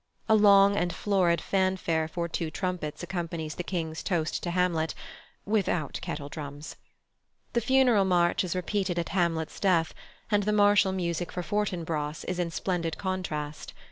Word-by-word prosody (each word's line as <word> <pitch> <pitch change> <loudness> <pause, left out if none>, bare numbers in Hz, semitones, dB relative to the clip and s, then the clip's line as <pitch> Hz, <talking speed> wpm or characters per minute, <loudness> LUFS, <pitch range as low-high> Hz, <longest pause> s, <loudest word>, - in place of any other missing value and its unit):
A - - +4
long 200 -1 +6
and 175 -3 0
florid 185 -4 +2
fanfare 185 -4 0
for 170 +1 -3
two 165 -1 -3
trumpets 175 -1 -4
accompanies 170 -3 -4
the 175 - -5
King's 160 -3 -3
toast 165 -5 -1
to 175 - -3
Hamlet 170 -3 0 0.5
(without 190 -8 0
kettledrums). 145 -2 -6 0.8
The 235 - +2
Funeral 245 -4 +4
March 175 -1 +2
is 185 -1 -3
repeated 185 0 -1
at 170 - -1
Hamlet's 170 -3 -1
death, 170 -6 +2 0.4
and 205 -1 +4
the 210 +1 0
martial 205 -1 +5
music 175 -2 -2
for 180 - -4
Fortinbras 165 -5 -2
is 180 -1 -3
in 175 -1 0
splendid 170 -1 -2
contrast. 155 -6 -4
175 Hz, 145 wpm, -28 LUFS, 160-195 Hz, 0.8 s, long